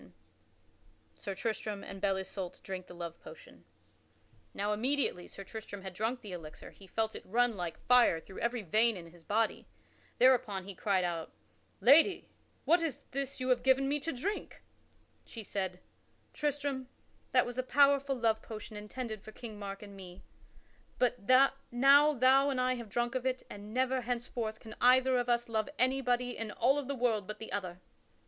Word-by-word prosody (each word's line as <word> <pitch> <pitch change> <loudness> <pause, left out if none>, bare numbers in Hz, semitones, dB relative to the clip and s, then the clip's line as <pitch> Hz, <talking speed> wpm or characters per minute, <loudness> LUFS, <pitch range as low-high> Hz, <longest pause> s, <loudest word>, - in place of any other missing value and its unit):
[Sidenote: - - -18 1.0
Sir 195 - -6
Tristram 215 -1 -3
and 195 - -9
Belle 195 -1 +2
Isoult 190 -1 -6
drink 185 -1 -6
the 175 - -11
love 170 -1 -7
potion] - - -14 0.9
Now 205 +1 -1
immediately 245 -5 0
Sir 195 - -9
Tristram 205 -2 -8
had 190 -1 -6
drunk 225 +6 -2
that 210 - -9
elixir 160 -3 -9
he 195 - -15
felt 220 +2 -1
it - - -6
run 240 +2 +1
like 175 -3 -4
fire 245 -9 +5
through 190 +4 -11
every 235 -1 -1
vein 220 +4 +3
in 170 -2 -10
his 170 -1 -18
body. 220 +5 0 0.5
Thereupon 245 -6 +4
he 200 +1 -7
cried 190 0 +1
out, 170 -2 -3 0.5
"Lady, 320 +9 +5 0.4
what 340 +1 +4
is 310 -6 -2
this 275 0 -3
you 255 0 -2
have 250 -1 +3
given 265 +1 +3
me 290 +2 +1
to 315 +4 -3
drink?" 375 +11 -4 0.6
She 225 - -9
said: 190 -3 -3 0.5
"Tristram, 285 -3 -2 0.4
that 250 -1 +4
was 245 +1 -5
a - - +4
powerful 280 +1 +3
love 225 -3 +1
potion 215 -1 -8
intended 215 +1 -6
for 215 - -11
King 215 -2 -9
Mark 200 0 -6
and 200 -1 -11
me. 185 -1 -11 0.7
But 245 -4 0 0.4
now 280 +5 +6
thou 265 +3 +5
and 265 -2 -1
I 255 0 +2
have 235 -4 -7
drunk 240 +3 -1
of 255 0 -1
it 255 0 -1
and 205 +1 -9
never 260 +2 +1
henceforth 235 -2 -3
can 220 -1 -10
either 255 +1 +5
of 245 0 -2
us 240 0 +2
love 220 +2 -1
anybody 250 -1 +1
in 225 -1 -4
all 260 +7 +2
of 280 - -5
the 280 - -2
world 225 -6 0
but 215 - -6
the 225 - -8
other." 180 -3 -4
235 Hz, 180 wpm, -32 LUFS, 200-255 Hz, 1.0 s, now